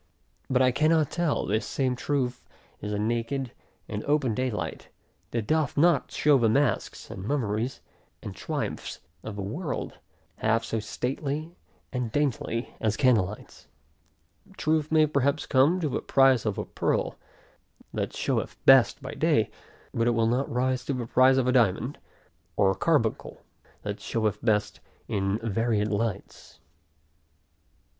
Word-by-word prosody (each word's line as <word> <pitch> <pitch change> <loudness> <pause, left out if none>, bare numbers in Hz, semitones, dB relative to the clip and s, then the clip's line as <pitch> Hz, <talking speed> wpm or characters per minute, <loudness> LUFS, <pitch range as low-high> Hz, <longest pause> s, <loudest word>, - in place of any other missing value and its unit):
But 130 0 +3
I 130 - +4
cannot 155 +2 +2
tell; 170 -3 0
this 110 +2 0
same 130 +3 -1
truth, 125 -2 -2 0.4
is 105 - -4
a 105 - -1
naked, 115 +4 -1 0.4
and 105 -1 -4
open 145 -5 +2
day 130 +3 0
light, 90 -8 -5 0.4
that 115 -3 -2
doth 155 +1 0
not 165 -2 +4
show 145 -2 +4
the 115 -2 +3
masks, 140 +4 0
and 95 - -7
mummeries, 115 -1 -1 0.4
and - - -6
triumphs, - - -4 0.2
of 110 - -7
the 100 - -4
world, 130 - -4 0.4
half 115 +1 +1
so 115 - -2
stately 140 +8 -3 0.4
and 125 -3 -2
daintily 130 -3 -1
as 110 -1 0
candle 125 -8 +4
lights. 105 +3 -11 0.9
Truth 155 -1 0
may 155 -1 +5
perhaps 140 0 0
come 140 +8 +3
to 155 - +1
the - - -2
price 135 -4 +4
of 105 - -1
a - - -3
pearl, - - -1 0.7
that - - -2
showeth - - -1
best - - +6
by - - -6
day; - - +2 0.4
but 115 0 +1
it 120 - +2
will 115 0 +2
not 125 +4 0
rise 130 +1 0
to 140 - -1
the 125 -2 -3
price 130 +3 +5
of 130 - +2
a 125 - +3
diamond, 120 +2 +2 0.6
or 95 -1 +3
carbuncle, - - 0 0.4
that - - -4
showeth 110 -2 -1
best 105 -2 +1 0.3
in 95 0 0
varied 115 -1 0
lights. 110 0 -4
125 Hz, 150 wpm, -27 LUFS, 110-140 Hz, 0.9 s, best